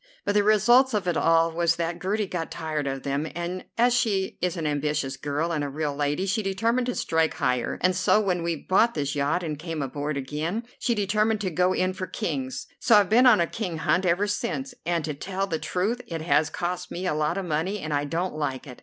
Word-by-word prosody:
But 205 Hz, -, +1 dB
the 205 Hz, -, +4 dB
result 230 Hz, +5 st, +5 dB
of 200 Hz, -3 st, -1 dB
it 175 Hz, -, +1 dB
all 165 Hz, 0 st, +3 dB
was 165 Hz, 0 st, +1 dB
that 170 Hz, +1 st, -3 dB
Gertie 210 Hz, +3 st, 0 dB
got 175 Hz, -3 st, -4 dB
tired 155 Hz, -3 st, -3 dB
of 135 Hz, -1 st, -3 dB
them, 140 Hz, +3 st, -1 dB
and, 175 Hz, +2 st, -4 dB
as 240 Hz, +1 st, +4 dB
she 200 Hz, -5 st, 0 dB
is 180 Hz, 0 st, -1 dB
an 165 Hz, -, -3 dB
ambitious 145 Hz, -2 st, -1 dB
girl 145 Hz, +4 st, -2 dB
and 155 Hz, -3 st, -1 dB
a 145 Hz, -, -2 dB
real 145 Hz, 0 st, -2 dB
lady, 145 Hz, +5 st, 0 dB
she 200 Hz, +3 st, 0 dB
determined 225 Hz, +6 st, 0 dB
to 250 Hz, -, -1 dB
strike 160 Hz, -1 st, +1 dB
higher, 125 Hz, -1 st, 0 dB
and 185 Hz, 0 st, +3 dB
so, 185 Hz, +3 st, +3 dB
when 185 Hz, -4 st, 0 dB
we 170 Hz, 0 st, -1 dB
bought 195 Hz, +9 st, +2 dB
this 145 Hz, -2 st, -1 dB
yacht 145 Hz, +5 st, 0 dB
and 155 Hz, -3 st, -4 dB
came 165 Hz, -1 st, -5 dB
abroad 145 Hz, +2 st, -3 dB
again, 155 Hz, -, -3 dB, 0.2 s
she 235 Hz, -, +1 dB
determined 215 Hz, +1 st, +1 dB
to 190 Hz, -3 st, -1 dB
go 180 Hz, +3 st, +2 dB
in 185 Hz, 0 st, 0 dB
for 185 Hz, 0 st, -5 dB
Kings, 130 Hz, -4 st, -3 dB
so 235 Hz, -4 st, +5 dB
I've 205 Hz, -3 st, +5 dB
been 245 Hz, +4 st, +6 dB
on 230 Hz, -6 st, +7 dB
a 170 Hz, -, +3 dB
King 180 Hz, -3 st, -4 dB
hunt 180 Hz, +3 st, +1 dB
ever 180 Hz, +4 st, +2 dB
since, 245 Hz, +5 st, -3 dB
and 170 Hz, -3 st, 0 dB
to 155 Hz, -, -3 dB
tell 190 Hz, +6 st, -3 dB
the 165 Hz, -5 st, -3 dB
truth 210 Hz, +7 st, -1 dB
it 165 Hz, -2 st, -4 dB
has 150 Hz, -1 st, +3 dB
cost 175 Hz, +2 st, -3 dB
me 180 Hz, +2 st, -5 dB
a 180 Hz, -, +1 dB
lot 155 Hz, +4 st, 0 dB
of 195 Hz, -, -2 dB
money 170 Hz, +5 st, -1 dB
and 155 Hz, -6 st, -4 dB
I 145 Hz, 0 st, 0 dB
don't 170 Hz, +5 st, -2 dB
like 145 Hz, -3 st, -3 dB
it. 125 Hz, -3 st, -11 dB
175 Hz, 235 wpm, -26 LUFS, 150-200 Hz, 0.2 s, on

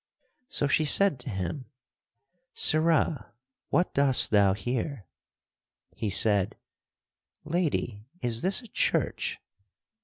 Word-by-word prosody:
So 145 Hz, -, -1 dB
she 155 Hz, +2 st, +2 dB
said 185 Hz, -1 st, +3 dB
to 125 Hz, -, -6 dB
him, 100 Hz, -, -5 dB, 0.9 s
"Sirrah, 155 Hz, -5 st, +2 dB, 0.3 s
what 180 Hz, -, 0 dB
dost 140 Hz, -2 st, +3 dB
thou 100 Hz, -2 st, +4 dB
here?" 120 Hz, -, -4 dB, 0.9 s
He 110 Hz, -, -4 dB
said, 100 Hz, 0 st, +1 dB, 0.9 s
"Lady, 150 Hz, -, -2 dB
is 115 Hz, -5 st, 0 dB
this 195 Hz, +6 st, +1 dB
a -, -, -12 dB
church?" -, -, -1 dB
130 Hz, 100 wpm, -27 LUFS, 105-155 Hz, 0.9 s, thou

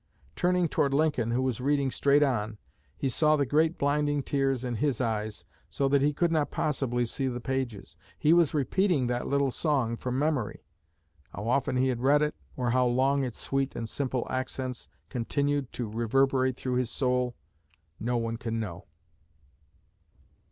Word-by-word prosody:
Turning 180 Hz, -1 st, +2 dB
toward 140 Hz, -2 st, +1 dB
Lincoln, 145 Hz, -6 st, +1 dB
who 125 Hz, +2 st, +1 dB
was 130 Hz, -2 st, -1 dB
reading 140 Hz, 0 st, +1 dB
straight 140 Hz, +3 st, +3 dB
on, 110 Hz, -6 st, -1 dB, 0.4 s
he 135 Hz, -, -1 dB
saw 155 Hz, +4 st, +3 dB
the 145 Hz, -2 st, +1 dB
great 155 Hz, +5 st, +2 dB
blinding 145 Hz, 0 st, +1 dB
tears 135 Hz, -2 st, 0 dB
in 120 Hz, -2 st, -2 dB
his 140 Hz, 0 st, 0 dB
eyes, 110 Hz, -3 st, -2 dB, 0.2 s
so 135 Hz, +12 st, 0 dB
that 140 Hz, 0 st, +3 dB
he 145 Hz, +2 st, +3 dB
could 170 Hz, +3 st, +1 dB
not 155 Hz, -3 st, +1 dB
possibly 125 Hz, -5 st, 0 dB
see 135 Hz, +3 st, -2 dB
the 120 Hz, -1 st, -3 dB
pages. 125 Hz, -5 st, -4 dB, 0.2 s
He 155 Hz, -, +4 dB
was 170 Hz, -4 st, +4 dB
repeating 155 Hz, 0 st, +1 dB
that 120 Hz, 0 st, -2 dB
little 140 Hz, -1 st, +1 dB
song 130 Hz, -6 st, 0 dB
from 125 Hz, +2 st, -3 dB
memory. 145 Hz, -6 st, -1 dB, 0.7 s
How 105 Hz, +4 st, -5 dB
often 130 Hz, +1 st, +1 dB
he 130 Hz, +1 st, +2 dB
had 120 Hz, -2 st, -2 dB
read 145 Hz, +3 st, +4 dB
it, 150 Hz, -, 0 dB, 0.2 s
or 125 Hz, -2 st, 0 dB
how 125 Hz, 0 st, +3 dB
long 135 Hz, +3 st, +2 dB
its 125 Hz, -3 st, -4 dB
sweet 135 Hz, 0 st, -1 dB
and 115 Hz, -, -4 dB
simple 130 Hz, 0 st, -2 dB
accents 130 Hz, -1 st, -4 dB, 0.2 s
continued 140 Hz, +2 st, -1 dB
to 120 Hz, -, -3 dB
reverberate 130 Hz, +3 st, +1 dB
through 125 Hz, -1 st, -2 dB
his 125 Hz, -2 st, 0 dB
soul, 125 Hz, -1 st, 0 dB, 0.6 s
no 120 Hz, +2 st, 0 dB
one 115 Hz, 0 st, -2 dB
can 115 Hz, 0 st, -3 dB
know." 95 Hz, -5 st, -6 dB
130 Hz, 170 wpm, -28 LUFS, 120-145 Hz, 0.7 s, He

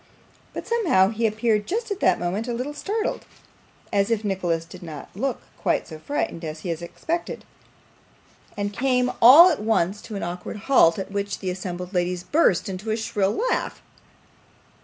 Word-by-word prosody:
But -, -, -6 dB
somehow 350 Hz, -, +3 dB
he 225 Hz, +1 st, 0 dB
appeared 215 Hz, -1 st, 0 dB
just 450 Hz, +3 st, -2 dB
at 400 Hz, -, -2 dB
that -, -, +3 dB
moment 190 Hz, +7 st, -2 dB
a 240 Hz, -, -2 dB
little 255 Hz, +5 st, -4 dB
startled, 425 Hz, +9 st, -2 dB, 0.7 s
as 200 Hz, +1 st, +2 dB
if 225 Hz, -2 st, 0 dB
Nicholas 175 Hz, -5 st, -1 dB
did -, -, -12 dB
not 155 Hz, -4 st, -8 dB
look 250 Hz, +5 st, -3 dB, 0.2 s
quite -, -, 0 dB
so 155 Hz, -2 st, -9 dB
frightened 170 Hz, -, -3 dB
as 155 Hz, -1 st, -6 dB
he 180 Hz, -, -5 dB
had 165 Hz, 0 st, -3 dB
expected, 330 Hz, -, -4 dB, 1.1 s
and 205 Hz, 0 st, -2 dB
came 250 Hz, +1 st, +1 dB
all 295 Hz, +10 st, +10 dB
at 310 Hz, -, -2 dB
once 210 Hz, -2 st, +1 dB
to 215 Hz, -, -8 dB
an 200 Hz, -, -4 dB
awkward 175 Hz, +4 st, -5 dB
halt, 170 Hz, -12 st, +5 dB
at 195 Hz, 0 st, -5 dB
which 200 Hz, 0 st, -2 dB
the 185 Hz, -2 st, -3 dB
assembled 180 Hz, 0 st, -6 dB
ladies 180 Hz, 0 st, -1 dB
burst 290 Hz, -, +2 dB
into 195 Hz, +3 st, -5 dB
a 220 Hz, -, 0 dB
shrill 205 Hz, -3 st, -1 dB
laugh. -, -, -2 dB
205 Hz, 175 wpm, -24 LUFS, 180-250 Hz, 1.1 s, all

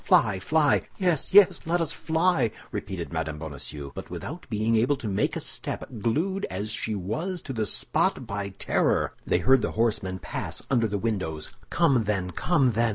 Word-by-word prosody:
Fly, 100 Hz, -4 st, +4 dB
fly!" 150 Hz, -, +3 dB, 0.2 s
"Yes, 180 Hz, -6 st, +1 dB
yes, 200 Hz, -1 st, +7 dB
let 175 Hz, +1 st, +2 dB
us 165 Hz, -2 st, 0 dB
fly!" 160 Hz, -6 st, +2 dB, 0.2 s
repeated 95 Hz, -5 st, -5 dB
Mme. 80 Hz, -2 st, -2 dB
Bonacieux, 75 Hz, -2 st, -6 dB
but -, -, -8 dB
without 160 Hz, +6 st, -7 dB
being 110 Hz, +1 st, +1 dB
able 120 Hz, +6 st, +3 dB
to 120 Hz, -, -5 dB
make 100 Hz, -1 st, 0 dB
a -, -, -1 dB
step, -, -, -3 dB
glued 170 Hz, -, 0 dB
as 100 Hz, +4 st, -3 dB
she 110 Hz, 0 st, -2 dB
was 155 Hz, -, -3 dB
to 135 Hz, -, -5 dB
the 110 Hz, -3 st, -1 dB
spot 125 Hz, -, +1 dB
by 100 Hz, -2 st, -3 dB
terror. 95 Hz, -, +1 dB
They -, -, +3 dB
heard 130 Hz, -1 st, +4 dB
the 105 Hz, -, -2 dB
horsemen 105 Hz, -5 st, +1 dB
pass -, -, -5 dB
under 115 Hz, -4 st, +3 dB
the 105 Hz, -1 st, -2 dB
windows. 95 Hz, -8 st, -2 dB, 0.2 s
"Come, 125 Hz, -5 st, +3 dB
then, 95 Hz, -3 st, -1 dB
come, 135 Hz, -, +2 dB
then!" 115 Hz, +1 st, +2 dB
110 Hz, 180 wpm, -26 LUFS, 95-145 Hz, 0.2 s, yes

